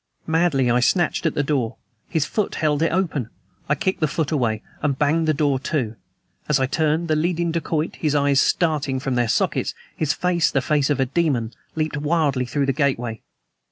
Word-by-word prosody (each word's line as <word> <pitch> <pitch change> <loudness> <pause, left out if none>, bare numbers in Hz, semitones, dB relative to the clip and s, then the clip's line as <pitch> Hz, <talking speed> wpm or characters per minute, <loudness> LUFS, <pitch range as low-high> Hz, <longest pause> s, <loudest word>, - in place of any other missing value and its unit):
Madly 160 -6 +2
I 120 - +3
snatched 170 +6 +2
at 155 - -2
the 145 - +1
door. 130 -6 -1 0.3
His 160 -4 +1
foot 210 +4 -2
held 150 -1 +1
it 165 - +2
open. 160 - -1 0.4
I 150 - +3
kicked 190 +6 -1
the 155 - +2
foot 155 +1 -2
away, 115 -8 0 0.2
and 140 -3 0
banged 155 +3 +2
the - - +4
door 140 -2 +1
to. 130 -5 -2 0.5
As 150 -2 +3
I 130 - +2
turned, 155 +4 0
the 155 - +2
leading 170 +1 0
dacoit, 160 -1 -2
his 150 -2 0
eyes 140 -1 +3
starting 150 -6 +1
from 135 0 -2
their 120 -1 +1
sockets, - - 0 0.2
his 155 -2 0
face 170 0 +1
the 135 - +1
face 145 +1 +1
of 145 - +1
a 135 - +3
demon 130 -5 0 0.2
leaped 155 -1 -1
wildly 145 -4 +1
through 140 +2 0
the 135 - +1
gateway. 125 -5 -1
150 Hz, 195 wpm, -22 LUFS, 135-160 Hz, 0.5 s, the